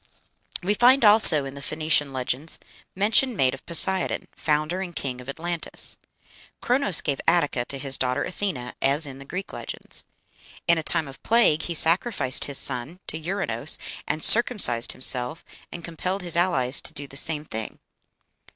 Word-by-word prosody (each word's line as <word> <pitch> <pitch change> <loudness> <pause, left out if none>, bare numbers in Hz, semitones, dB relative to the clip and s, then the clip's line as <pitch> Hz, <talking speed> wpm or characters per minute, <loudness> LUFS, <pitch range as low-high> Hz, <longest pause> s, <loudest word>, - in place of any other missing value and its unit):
We 200 +3 0
find 245 +3 +3
also, 205 -9 +8
in 135 - -8
the 140 - -11
Phoenician 155 -1 -1
legends, 130 +4 -4 0.4
mention 220 +6 +2
made 130 -7 +1
of 135 - -11
Poseidon, 185 +2 +1
founder 155 +4 -2
and 175 -3 -8
king 125 -3 -5
of 125 - -12
Atlantis. 170 +3 +1 0.6
Chronos 240 - +1
gave 140 -2 -3
Attica 150 -8 0
to 140 - -5
his 135 -1 -2
daughter 130 +2 -2
Athena, 180 -11 -5
as 140 +4 +2
in 135 -1 -8
the 140 - -11
Greek 185 +7 -7
legends. - - -9 0.6
In 170 -1 +3
a - - -3
time 160 -1 -2
of 135 - -13
plague 225 -9 +2
he 170 - -5
sacrificed 165 - +1
his 140 -2 -4
son 135 +7 -1
to - - -8
Ouranos, 155 - -2 0.3
and 155 - -3
"circumcised 210 - +5
himself, 125 +3 0 0.3
and 170 -1 -9
compelled 180 +3 -5
his 175 -2 -2
allies 145 -7 0
to - - -4
do 145 - -8
the 135 - -15
same 150 +1 +2
thing." 110 -5 -7
155 Hz, 165 wpm, -23 LUFS, 135-185 Hz, 0.6 s, also